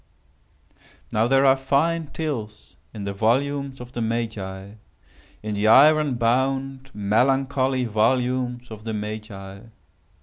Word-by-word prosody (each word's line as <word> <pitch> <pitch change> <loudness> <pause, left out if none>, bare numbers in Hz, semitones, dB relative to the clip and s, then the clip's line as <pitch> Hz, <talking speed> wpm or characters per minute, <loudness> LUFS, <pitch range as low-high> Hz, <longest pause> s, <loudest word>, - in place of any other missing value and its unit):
Now 110 +2 +2
there 135 +2 +4
are 135 0 +6
fine 150 +5 0
tales 140 -9 -6 0.2
in 105 -3 -7
the 100 0 -3
volumes 135 +6 0
of 125 0 -10
the 120 - -4
Magi—in 110 -4 -4 0.8
the 105 +1 0
iron 145 +3 +6
bound, 130 +3 0
melancholy 130 +5 +1
volumes 125 +2 0
of 110 -1 -9
the 110 -1 -4
Magi. 105 -2 -7
125 Hz, 110 wpm, -23 LUFS, 110-135 Hz, 0.8 s, are